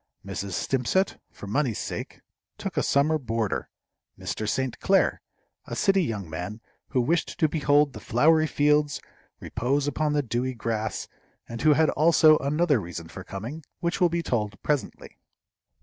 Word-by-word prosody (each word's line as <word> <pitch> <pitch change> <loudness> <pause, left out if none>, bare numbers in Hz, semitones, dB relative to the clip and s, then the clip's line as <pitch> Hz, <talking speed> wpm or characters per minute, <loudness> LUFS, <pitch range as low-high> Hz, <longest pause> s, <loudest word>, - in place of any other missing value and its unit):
Mrs. 100 0 -4
Stimpcett, 135 - 0
for - - -10
money's 115 +2 0
sake, - - -5 0.4
took - - -5
a - - +2
summer 155 +3 +2
boarder, 115 -5 -2 0.5
Mr. 110 -1 -3
St. 130 0 -2
Clair, 195 0 +2 0.5
a - - -4
city 195 -2 +3
young 105 - -3
man, 90 +7 -5 0.3
who 130 - 0
wished 165 +7 0
to 160 - +4
behold 145 -2 +2
the - - -8
flowery 155 +6 +3
fields, 150 0 +2 0.4
repose 135 +4 -1
upon 150 +1 0
the 145 -1 +1
dewy 125 +2 -2
grass, 110 -2 -3 0.4
and 115 -1 -6
who 155 - +6
had 155 +1 +3
also 155 0 +5
another 145 -2 +2
reason 85 -2 -7
for 95 +2 -8
coming, 115 - -7 0.2
which 170 +2 -2
will 175 - +5
be 170 0 -1
told 105 -6 -2
presently. 145 -3 -3
140 Hz, 155 wpm, -26 LUFS, 110-155 Hz, 0.5 s, who